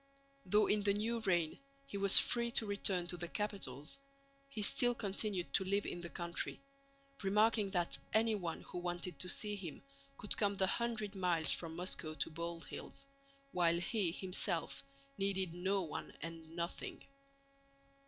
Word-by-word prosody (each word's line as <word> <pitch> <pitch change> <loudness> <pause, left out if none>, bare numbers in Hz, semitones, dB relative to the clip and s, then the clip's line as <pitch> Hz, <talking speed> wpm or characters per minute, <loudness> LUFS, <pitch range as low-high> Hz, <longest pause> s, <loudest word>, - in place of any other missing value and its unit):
Though 210 +3 +5
in 210 - +2
the 200 0 +2
new 230 +3 0
reign 175 -7 0 0.3
he 275 - -9
was 200 -1 +6
free 235 -1 +3
to 225 - +5
return 200 -3 +1
to 175 0 -2
the 175 0 -4
capitals, 195 - -2 0.5
he 220 -6 -2
still 245 +1 +5
continued 200 -3 -2
to - - +3
live 200 +2 0
in 175 - -4
the 175 - -6
country, 170 +2 -3 0.6
remarking 210 +1 +3
that 175 -3 0
anyone 215 -6 +1
who 180 - -7
wanted 175 0 -4
to 180 - +5
see 210 +3 +3
him 175 -9 -7 0.3
could 210 - -2
come 205 -1 +1
the 190 - +3
hundred 215 -1 -1
miles 180 -5 +1
from 165 -1 -1
Moscow 170 -3 -2
to 160 - -1
Bald 170 +1 -5
Hills, - - -8 0.5
while 170 -3 +3
he 190 -1 0
himself 180 -3 -1 0.4
needed 190 -3 0
no 190 +3 0
one 155 -3 -6
and 165 -1 -8
nothing. 170 0 -5
190 Hz, 155 wpm, -36 LUFS, 170-210 Hz, 0.6 s, was